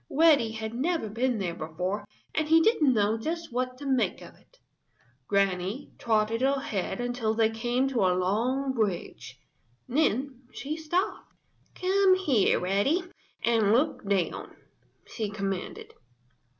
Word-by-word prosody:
Reddy 285 Hz, -8 st, +4 dB
had 220 Hz, 0 st, -5 dB
never 310 Hz, +1 st, -1 dB
been 240 Hz, +3 st, 0 dB
there 185 Hz, -4 st, -2 dB
before 180 Hz, +6 st, -4 dB, 0.3 s
and 310 Hz, -1 st, 0 dB
he 325 Hz, 0 st, +7 dB
didn't 320 Hz, -, +3 dB
know 215 Hz, +1 st, +2 dB
just 330 Hz, +2 st, -4 dB
what 255 Hz, +1 st, -2 dB
to 285 Hz, -, -9 dB
make 255 Hz, -8 st, +1 dB
of -, -, -12 dB
it. -, -, -26 dB, 0.7 s
Granny 195 Hz, +5 st, 0 dB
trotted 220 Hz, 0 st, +1 dB
ahead 265 Hz, -7 st, -1 dB
until 245 Hz, -2 st, -1 dB
they 225 Hz, 0 st, +3 dB
came 240 Hz, +4 st, 0 dB
to 255 Hz, -3 st, -1 dB
a 180 Hz, 0 st, +2 dB
long 245 Hz, +9 st, 0 dB
bridge. 190 Hz, -, -3 dB, 0.5 s
Then 260 Hz, -1 st, 0 dB
she 295 Hz, +3 st, -4 dB
stopped. 330 Hz, +4 st, -2 dB, 0.4 s
"Come 380 Hz, 0 st, +3 dB
here, 285 Hz, -, +2 dB
Reddy, 200 Hz, -, +1 dB, 0.4 s
and 225 Hz, -3 st, +3 dB
look 265 Hz, +7 st, +1 dB
down," 195 Hz, -4 st, -2 dB, 0.5 s
she 215 Hz, -3 st, -4 dB
commanded. 195 Hz, -2 st, -5 dB
235 Hz, 135 wpm, -28 LUFS, 205-280 Hz, 0.7 s, he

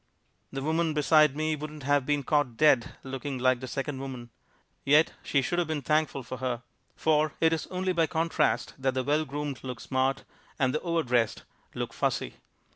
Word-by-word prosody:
The 135 Hz, 0 st, -4 dB
woman 160 Hz, +1 st, +1 dB
beside 150 Hz, -1 st, +5 dB
me 155 Hz, 0 st, 0 dB
wouldn't 150 Hz, 0 st, -8 dB
have 145 Hz, -1 st, +2 dB
been 145 Hz, -1 st, +1 dB
caught 140 Hz, -5 st, +1 dB
dead 135 Hz, -6 st, +4 dB
looking 135 Hz, +1 st, -4 dB
like 130 Hz, 0 st, +2 dB
the 130 Hz, -, -6 dB
second 135 Hz, +1 st, -3 dB
woman. 130 Hz, -3 st, -7 dB, 0.5 s
Yet 150 Hz, +3 st, +4 dB
she 140 Hz, -2 st, +1 dB
should 175 Hz, +7 st, 0 dB
have 175 Hz, -, 0 dB
been 155 Hz, -3 st, -2 dB
thankful 150 Hz, -2 st, +1 dB
for 125 Hz, +2 st, -6 dB
her. 125 Hz, -1 st, -3 dB, 0.3 s
For 155 Hz, -1 st, +2 dB
it 165 Hz, 0 st, +4 dB
is 160 Hz, -, -2 dB
only 185 Hz, 0 st, -1 dB
by 165 Hz, -2 st, +2 dB
contrast 165 Hz, -1 st, 0 dB
that 130 Hz, -1 st, 0 dB
the 130 Hz, -, 0 dB
well 150 Hz, +3 st, +1 dB
groomed 145 Hz, -1 st, -5 dB
look 125 Hz, -3 st, -5 dB
smart, 130 Hz, +1 st, 0 dB, 0.3 s
and 130 Hz, -1 st, +1 dB
the 155 Hz, -, -1 dB
overdressed 125 Hz, -10 st, 0 dB, 0.3 s
look -, -, -4 dB
fussy. -, -, -1 dB
145 Hz, 185 wpm, -28 LUFS, 130-155 Hz, 0.5 s, beside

